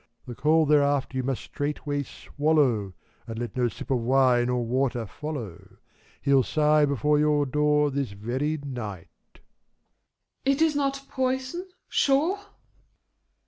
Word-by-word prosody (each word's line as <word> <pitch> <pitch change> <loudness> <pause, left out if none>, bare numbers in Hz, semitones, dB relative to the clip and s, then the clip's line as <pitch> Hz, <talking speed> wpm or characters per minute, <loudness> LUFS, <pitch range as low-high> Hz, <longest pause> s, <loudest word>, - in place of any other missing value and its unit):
The 125 - -7
coal 155 +5 +3
thereafter 145 -2 +2
you - - +1
must 130 0 -3
straightway 145 0 -3
swallow, 140 -9 0 0.3
And 115 -1 -6
let 120 0 -5
no 125 -1 +2
sip 120 - -7
of 130 - +2
wine 125 0 +3
or 125 -1 0
water 125 -1 0
follow: 120 - -7 0.5
Hell 140 -1 +4
sigh 150 +2 +3
before 145 +2 +2
your 150 -1 +3
door 150 +1 +2
this 135 -6 -2
very 130 +9 -2
night. 110 - -7 0.3
THE - - -21 1.0
LADY. 275 +1 +3
It - - -4
is 315 -2 +2
not 275 -1 -1
poison, 260 +8 -2 0.2
sure? 305 +8 +2
140 Hz, 140 wpm, -26 LUFS, 125-150 Hz, 1.0 s, Hell